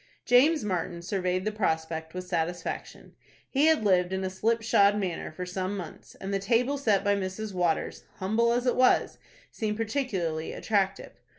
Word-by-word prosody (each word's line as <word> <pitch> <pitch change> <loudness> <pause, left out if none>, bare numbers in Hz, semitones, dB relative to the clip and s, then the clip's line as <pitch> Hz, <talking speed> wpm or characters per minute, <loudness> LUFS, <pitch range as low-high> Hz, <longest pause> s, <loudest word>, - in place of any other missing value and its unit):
James 280 +6 +5
Martin 175 -3 -3
surveyed 185 0 -1
the 215 - 0
prospect 160 -5 -2
with 185 0 -4
satisfaction. 175 0 -4 0.3
He 285 +3 +2
had 320 -7 +4
lived 180 -2 +3
in 190 0 -2
a 185 - -2
slip 225 +4 0
shod 205 -2 +4
manner 185 -6 -3
for 180 +3 -6
some 185 +2 -3
months, 175 -5 -9
and 195 +1 -5
the 195 - +1
table 245 +7 +1
set 210 -7 +2
by 205 -1 +3
Mrs. 200 +2 -4
Waters, 175 -3 -1
humble 220 +5 +1
as 245 +1 0
it 250 - +2
was, 255 0 +3 0.3
seemed 210 -1 -2
particularly 205 - -2
attractive. 195 -2 -1
195 Hz, 170 wpm, -28 LUFS, 180-225 Hz, 0.3 s, James